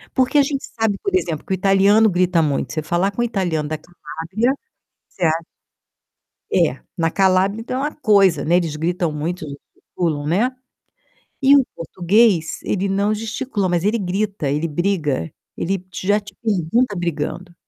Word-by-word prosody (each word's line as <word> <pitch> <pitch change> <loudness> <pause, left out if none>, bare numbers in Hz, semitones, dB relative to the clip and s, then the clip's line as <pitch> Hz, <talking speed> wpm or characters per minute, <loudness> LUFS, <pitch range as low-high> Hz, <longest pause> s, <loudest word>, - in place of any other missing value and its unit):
Porque 260 +2 +2
a - - +6
gente 275 -2 -3
sabe, 220 -3 +2
por 395 - -2
exemplo, 165 - -1
que 190 - -2
o 185 - -2
italiano 200 +3 +5
grita 180 -2 +2
muito. 145 -3 -1
Você 155 - -1
falar 175 +5 0
com 240 - -3
o - - +2
italiano 160 -7 -1
da 155 - -2
Calábria 175 - -3 0.6
você 180 - -3
a 160 - +4 1.2
é - - +2 0.2
na 165 -1 +1
Calábria, 195 +3 +2
ainda, 235 - -6
é - - -1
uma 290 +3 -1
coisa, 195 - +3
né, 170 +3 +3
eles 165 -4 -1
gritam 170 +1 -1
muito, 155 +3 -4
gesticulam 145 +2 -5
né. 210 +11 +2 0.9
E 280 +2 +7
o 275 - +4
português, 180 +1 +2
ele 200 0 -1
não 200 +2 +1
gesticula, 220 -1 -2
mas 175 -1 +1
ele 215 +3 +2
grita, 195 -4 -2
ele 150 +4 -1
briga, 155 - -1 0.2
ele 185 +1 -2
já 205 +4 +1
te 200 -1 -13
pergunta 215 +2 +1
brigando. 175 +1 -3
185 Hz, 165 wpm, -20 LUFS, 165-210 Hz, 1.2 s, E